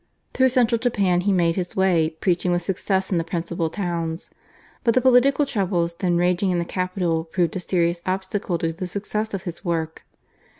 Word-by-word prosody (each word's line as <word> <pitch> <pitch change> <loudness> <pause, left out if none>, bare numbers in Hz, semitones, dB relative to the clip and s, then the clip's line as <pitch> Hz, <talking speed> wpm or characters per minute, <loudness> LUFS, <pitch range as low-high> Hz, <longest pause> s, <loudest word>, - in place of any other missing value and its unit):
Through 260 0 +4
central 240 -3 +2
Japan 200 -7 +1
he 200 +2 +1
made 170 -3 +2
his 180 -2 -3
way 180 -4 +3
preaching 175 +2 0
with 175 0 0
success 190 +1 -1
in 175 - +2
the - - -1
principal 170 -1 -2
towns, 170 -3 -4 0.5
but 230 - +2
the - - +6
political 260 +3 +4
troubles 180 -8 -1
then 175 0 0
raging 180 +2 +2
in 180 - +1
the 170 - -1
capital 180 -3 -1
proved 170 +1 -1
a - - -1
serious 170 -1 0
obstacle 190 -1 -2
to 165 0 -2
the 185 +2 -5
success 210 +3 -3
of 190 - -6
his 175 0 -7
work. 160 -3 -2
180 Hz, 185 wpm, -23 LUFS, 170-195 Hz, 0.5 s, the